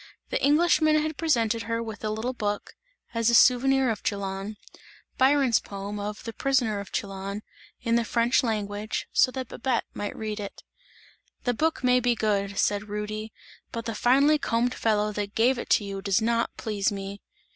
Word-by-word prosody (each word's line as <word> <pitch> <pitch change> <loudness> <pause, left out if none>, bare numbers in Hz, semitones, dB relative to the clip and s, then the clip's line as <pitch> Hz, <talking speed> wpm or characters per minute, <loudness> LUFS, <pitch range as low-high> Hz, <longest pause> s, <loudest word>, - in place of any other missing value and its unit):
The - - -1
Englishman 310 0 +4
had 310 0 -2
presented 230 -9 +1
her 230 0 0
with 220 -2 -8
a 215 - -1
little 220 +4 -2
book, 205 -4 -3 0.4
as 230 0 +2
a 235 - +4
souvenir 260 +1 +5
of 215 - -4
Chillon, 200 +1 -3 0.6
Byron's 265 -3 +4
poem 200 +1 -6
of 210 +1 -5
"The 230 - -6
Prisoner 245 -7 +1
of 200 - -8
Chillon," 195 +1 -4 0.4
in 230 -1 +2
the 235 - +2
French 235 +2 +2
language, 210 -2 -2
so - - +5
that 260 -1 -5
Babette 245 -1 -1
might 205 - -5
read 215 -1 -4
it. 200 -1 -7 0.8
"The 245 - +1
book 315 +3 0
may 250 0 +4
be 245 -1 +2
good," 200 -3 0
said 205 +1 0
Rudy, 215 +1 -4 0.4
"but 230 0 -5
the 230 - -2
finely 275 +7 +4
combed 240 -1 0
fellow 210 -1 +1
that 205 -1 -4
gave 240 +3 +3
it - - -6
to - - +4
you 195 -1 -5
does 195 0 +2
not 230 +1 0
please 210 -2 -1
me!" 200 0 -6
225 Hz, 180 wpm, -26 LUFS, 205-250 Hz, 0.8 s, souvenir